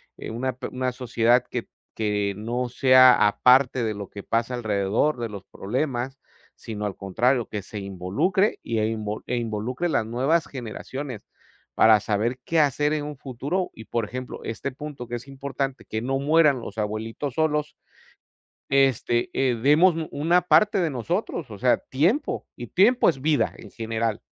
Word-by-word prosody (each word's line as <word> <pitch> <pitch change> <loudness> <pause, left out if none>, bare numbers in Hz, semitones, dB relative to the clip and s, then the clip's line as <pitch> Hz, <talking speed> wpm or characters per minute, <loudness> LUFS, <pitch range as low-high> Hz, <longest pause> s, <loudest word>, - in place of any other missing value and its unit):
eh - - -8
una 130 +3 -2
p 130 - -5
una 130 0 -2
sociedad 120 -1 +2
que 120 - -4 0.3
que 105 -2 0
no 120 +4 -3
sea 130 -1 +6
a 105 - -2
parte 125 -1 +5
de 110 -1 -1
lo 100 -2 -7
que 100 - -9
pasa 115 +2 -1
alrededor 110 +5 0
de 115 -1 -3
los 100 -2 -8
problemas, 130 +3 -3 0.4
sino 105 -2 -5
al 100 - -5
contrario, 120 +6 +1
que 105 - -4
se 105 +2 -9
involucre 100 - 0
y 115 -1 -1
e 110 - +1
invo 110 -1 -3
e 125 - -1
involucre 120 +8 -2
las 140 - +1
nuevas 130 +9 +1
generaciones, 130 0 -6 0.5
para 110 -1 +6
saber 110 +5 -1
qué 165 - +1
hacer 150 0 +2
en 150 -1 -1
un 150 0 -6
futuro, 140 +8 -3
y, 110 - -10
por 115 -1 -2
ejemplo, 125 +4 -7
este 130 +5 -4
punto 140 -2 -8
que 120 - -9
es 120 +2 -8
importante, 135 -1 -4
que 110 - -4
no 135 +3 -1
mueran 150 -1 +4
los 110 -1 -7
abuelitos 110 +6 -3
solos, 150 -1 0 0.9
este, 135 -3 +2
eh, 130 -2 +1
demos 150 +9 +4
u 160 -1 -3
una 165 +5 +2
parte 210 +4 +4
de 170 -4 +1
nosotros, 120 -6 -3
o - - -8
sea, - - +3
tiempo, 185 - 0
y 120 - -7
tiempo 220 - +4
es 135 -6 -3
vida, 150 0 +1
en - - -12
general. 115 -1 -2
125 Hz, 175 wpm, -24 LUFS, 110-145 Hz, 0.9 s, sea